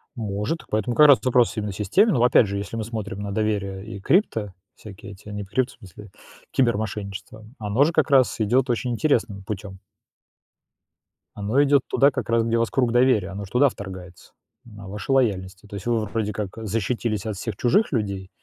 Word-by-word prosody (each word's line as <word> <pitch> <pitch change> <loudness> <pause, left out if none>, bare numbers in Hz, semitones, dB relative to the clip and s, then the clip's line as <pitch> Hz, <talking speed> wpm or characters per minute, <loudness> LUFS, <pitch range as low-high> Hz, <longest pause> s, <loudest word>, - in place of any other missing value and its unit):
Может, 105 +7 -3
поэтому 110 +2 -1
как 150 +2 +7
раз 140 -4 +8
этот 120 - -5
вопрос 125 -1 +3
именно 105 -1 -2
системный. 175 - +2
Ну, 120 - +2
опять 125 -3 +5
же, 100 +1 -3
если 100 +3 -5
мы 115 - -2
смотрим 105 -3 -5
на 100 -1 -4
доверие 100 -2 -2
и 110 -3 -8
крипто, 110 - +1 0.2
всякие 105 -1 -11
эти, 100 +1 -15
не 105 0 -5
прють, 125 +6 -1
в - - -19
смысле, 100 +1 -13 0.4
кибермошенничество, 105 -4 -2
м, 110 +5 -17
оно 105 +5 +2
же 160 - +2
как - - +2
раз 135 -3 +4
идёт 125 +4 +2
очень 120 +1 -1
интересным 115 -7 0
путём. 95 -1 -7 1.6
Оно 110 +8 +2
идёт 140 -1 +4
туда, 140 +1 +4
как 125 - -4
раз, 115 0 +3
где 115 0 0
у - - +1
вас 115 - +1
круг 125 -4 +1
доверия, 120 -6 +3
оно 100 +1 -6
же 95 - -16
туда 135 +3 +4
вторгается, 95 -4 -10 0.3
на 105 -4 -12
вашу 105 +7 -3
лояльность. 95 -7 0
И - - -15
то 100 - -9
есть 100 - -7
вы 115 -3 0
вроде 105 0 -3
как, 105 +1 -5
э, 110 - -6
защитились 110 0 -2
от 110 -2 -3
всех 105 +2 -5
чужих 180 - +2
людей, 100 -6 -2
110 Hz, 205 wpm, -23 LUFS, 100-120 Hz, 1.6 s, раз